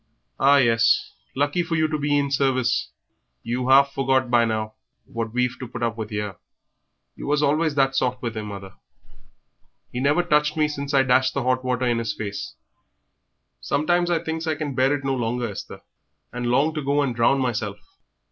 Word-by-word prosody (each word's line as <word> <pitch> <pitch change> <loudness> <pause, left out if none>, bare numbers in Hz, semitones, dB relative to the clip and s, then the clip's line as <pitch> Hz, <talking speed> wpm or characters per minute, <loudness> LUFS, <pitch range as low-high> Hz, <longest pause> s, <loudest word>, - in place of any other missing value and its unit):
Ah, 140 +2 +5
yes, 115 -3 +3 0.2
lucky 145 +6 +1
for 170 -1 -2
you 155 0 +2
to 155 - -3
be 145 0 +1
in 140 -1 0
service; 130 -3 +1 0.5
you've 125 +2 -2
half 140 +1 +6
forgot 130 -2 +1
by 120 -1 +5
now 110 -1 -2 0.3
what 115 -1 -4
we've 125 +1 -1
to 130 - -6
put 120 0 -6
up 115 -1 0
with 110 -1 -6
'ere." 105 -2 -4 0.8
"You - - -8
was 150 +1 +1
always 150 +1 +1
that 135 -1 +2
soft 125 -1 0
with 115 -2 -4
him, 110 -1 -5
mother; 100 -2 -8 1.2
he 125 - -4
never 145 +6 +2
touched 150 -2 +1
me 155 -1 +3
since 140 -1 -4
I 135 - +5
dashed 130 0 +2
the 140 - -1
hot 130 +1 +1
water 125 0 -1
in 120 -1 +1
his 115 - -3
face." 100 -2 -6 1.0
"Sometimes 175 - +1
I 175 - +2
thinks 160 0 -4
I 155 - +1
can 145 -1 -4
bear 130 +1 +2
it 140 - -6
no 135 - +1
longer, 120 -1 -1
Esther, 105 - -8 0.5
and 120 0 -3
long 140 +6 +2
to 155 - -3
go 140 +1 +1
and 125 -4 -2
drown 120 +4 +3
meself. 110 -5 -2
130 Hz, 195 wpm, -23 LUFS, 120-145 Hz, 1.2 s, half